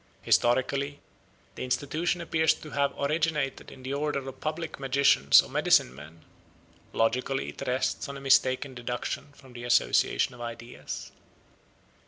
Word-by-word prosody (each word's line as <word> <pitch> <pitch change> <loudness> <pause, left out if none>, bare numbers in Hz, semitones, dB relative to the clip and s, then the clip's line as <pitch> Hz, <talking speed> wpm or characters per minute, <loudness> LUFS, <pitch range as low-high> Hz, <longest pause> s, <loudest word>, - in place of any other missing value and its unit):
Historically, 140 +4 +1 0.5
the - - -6
institution 155 +7 -1
appears 160 -1 +2
to 155 - -11
have 140 0 +1
originated 150 -2 -1
in 130 - -13
the 130 +1 -4
order 140 -2 -2
of 135 - -8
public 160 0 -4
magicians 135 - +5
or - - -11
medicine 60 - +3
men; 80 +4 -13 0.7
logically 125 +4 0
it - - -10
rests 130 +2 -1
on 140 - -6
a - - -8
mistaken 135 0 +2
deduction 125 +3 -4
from 130 -3 -17
the 120 0 -8
association 120 - +2
of 120 - -12
ideas. 120 0 -7
135 Hz, 140 wpm, -28 LUFS, 120-145 Hz, 0.7 s, magicians